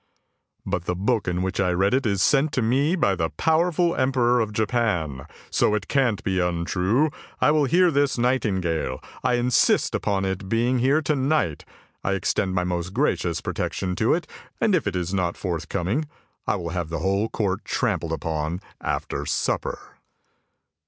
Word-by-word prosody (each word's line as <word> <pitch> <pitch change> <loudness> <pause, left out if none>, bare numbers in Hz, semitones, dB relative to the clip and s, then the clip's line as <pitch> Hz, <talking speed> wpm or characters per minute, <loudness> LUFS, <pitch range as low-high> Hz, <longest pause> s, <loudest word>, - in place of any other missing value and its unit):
" - - -50
" - - -50
But 95 -3 -2
the 90 - -1
book 105 +5 0
in 90 +1 0
which 95 +1 -2
I 95 -2 +2
read 95 +5 +2
it 130 -2 +2
is 100 -2 +1
sent 150 +1 +3
to 125 - +1
me 140 +9 +2
by 100 - +2
the 80 -2 -1
power 160 - +2
ful 170 +1 +1
Emperor 125 -2 +2
of 110 -2 0
Japan, 105 - -1 0.2
so 105 - +2
it 105 - -3
can't 130 -7 +1
be 95 -3 0
untrue, 90 - +1 0.3
I - - +4
will 150 -1 +3
hear 175 +5 +4
this 140 -2 +1
nightingale, 100 -10 0 0.2
I 125 - +2
insist 120 0 +2
upon 100 -2 0
its 95 0 -2
being 115 +5 +1
here 140 +6 +3
to 150 - +1
night. 135 - 0 0.4
I 95 - 0
extend 95 0 0
my 90 - +1
most 90 +1 -3
gracious 90 - 0
protection 90 -1 -2
to 110 - +3
it, 170 - -3 0.3
and 220 - +2
if 165 - +1
it 100 - -2
is 90 0 -2
not 90 -3 0
forthcoming, 95 - -2 0.4
I - - +2
will 85 - -4
have 85 -2 -3
the 85 - -2
whole 100 +6 0
court 100 -4 -1
trampled 80 - -1
upon 80 +1 -2 0.2
after - - -3
supper! - - -2
100 Hz, 180 wpm, -24 LUFS, 90-130 Hz, 0.4 s, I